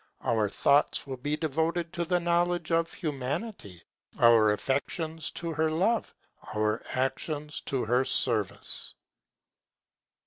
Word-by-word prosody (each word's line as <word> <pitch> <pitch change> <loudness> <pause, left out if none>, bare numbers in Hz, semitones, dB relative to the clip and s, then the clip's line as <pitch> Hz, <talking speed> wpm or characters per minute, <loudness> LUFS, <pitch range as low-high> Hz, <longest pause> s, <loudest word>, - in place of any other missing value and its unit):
Our 110 -3 +1
thoughts 140 +8 +2
will 135 -2 -5
be 145 +4 -2
devoted 160 +2 -1
to 175 -1 -1
the 180 +1 +2
knowledge 175 0 +1
of 165 0 +2
Humanity, 140 - -4 0.3
our 115 -2 +6
affections 155 +7 -2
to 170 -1 -4
her 160 +1 +1
love, 195 +9 0 0.4
our 105 +1 +1
actions 145 +3 -2
to 135 -4 0
her 125 +3 +3
service. 115 -6 -1
150 Hz, 115 wpm, -29 LUFS, 125-170 Hz, 0.4 s, our